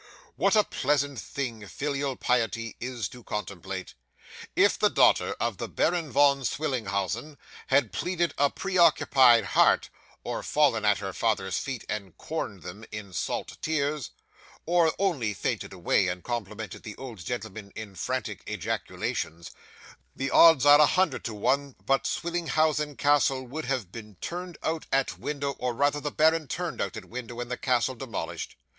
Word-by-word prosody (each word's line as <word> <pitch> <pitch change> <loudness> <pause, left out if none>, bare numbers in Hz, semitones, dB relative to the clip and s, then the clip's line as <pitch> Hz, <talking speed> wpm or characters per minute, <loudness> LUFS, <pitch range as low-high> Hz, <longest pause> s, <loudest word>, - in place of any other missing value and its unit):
'What 200 +2 +3
a 210 - +6
pleasant 145 -3 0
thing 115 -7 -5
filial 140 +2 -2
piety 115 -2 0
is 120 -4 -3
to 125 -1 -13
contemplate! 95 -3 -5 0.6
If - - +4
the - - +4
daughter - - +4
of - - -1
the - - -4
Baron 170 -2 0
Von 140 +2 +5
Swillenhausen 120 - -2 0.3
had 135 -7 +3
pleaded 175 -1 -1
a 145 0 +3
preoccupied 140 - +4
heart, - - +3 0.3
or - - -3
fallen 135 -8 +2
at 105 -1 +4
her 95 -2 -5
father's 100 -4 0
feet 130 -5 -5
and 100 -5 -5
corned 105 - -5
them 95 +5 -8
in 105 -3 -7
salt - - -3
tears, 150 -3 -1 0.6
or 170 -1 +4
only 140 - 0
fainted - - -2
away, 90 +1 +1
and 90 0 -3
complimented 110 -4 -5
the 105 - -8
old 125 -6 -8
gentleman 110 -1 -5
in 110 -3 -7
frantic 95 - -3
ejaculations, 85 +1 -3 0.6
the 135 0 -2
odds 165 -5 +7
are 145 +1 +8
a 150 - +7
hundred 185 +1 +1
to 115 - -3
one 140 +6 0
but 135 0 +2
Swillenhausen 155 -4 0
Castle 140 -2 +3
would 150 +6 -5
have 125 -8 -2
been 105 -2 -10
turned 175 - -6
out 160 0 -2
at 135 -1 0
window, 140 -1 -2
or 125 -2 -1
rather 145 +3 +2
the 150 +1 -3
baron 160 +1 +3
turned 175 +5 -3
out 100 - -3
at - - -8
window, 120 -1 -7
and 120 0 -5
the - - 0
castle 130 0 +1
demolished. 125 -3 -5
130 Hz, 155 wpm, -27 LUFS, 110-150 Hz, 0.6 s, are